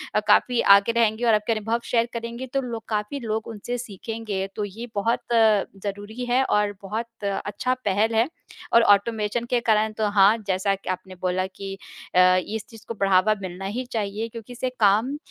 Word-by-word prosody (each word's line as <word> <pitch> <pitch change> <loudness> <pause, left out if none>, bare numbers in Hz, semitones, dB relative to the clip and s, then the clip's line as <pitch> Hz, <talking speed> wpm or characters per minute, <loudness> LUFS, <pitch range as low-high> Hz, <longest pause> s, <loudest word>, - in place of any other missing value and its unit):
अ, - - +5
काफ़ी 255 - +4 0.2
आगे 200 +3 +7
रहेंगे 230 0 +1
और 230 - +5
आपके 210 +2 +2
अनुभव 225 +2 -1
शेयर 230 -1 +1
करेंगे 235 +2 -5
तो 275 - +1
लोग 230 -3 -5
काफ़ी 210 +5 -2
लोग 220 -2 -3
उनसे 230 +3 -5
सीखेंगे। 220 -3 -5
तो 210 - -2
ये 225 +5 -8
बहुत 215 +3 +1
ज़रूरी 210 0 0
है 245 +2 +2
और 210 -4 +1
बहुत 220 +3 -6
अच्छा 205 +5 -1
पहल 210 +3 +1
है 225 +3 +3 0.5
और 235 - +7
ऑटोमेशन 215 +2 +2
के 245 - +2
कारण 220 -2 +2
तो 215 -1 +1
हाँ, 205 +2 +5
जैसा 195 +1 +1
कि 195 - -9
आपने 185 0 -5
बोला 185 0 0
कि 195 +1 -8 0.4
अ, - - +6 0.3
इस 220 0 -4
चीज़ 225 -1 -14
को - - -4
बढ़ावा 195 0 +3
मिलना 185 0 -6
ही 235 +6 -3
चाहिए 215 0 -2
क्योंकि 230 +1 -9
इससे 250 +1 -2
काम 220 +7 +3
215 Hz, 185 wpm, -24 LUFS, 200-230 Hz, 0.5 s, आगे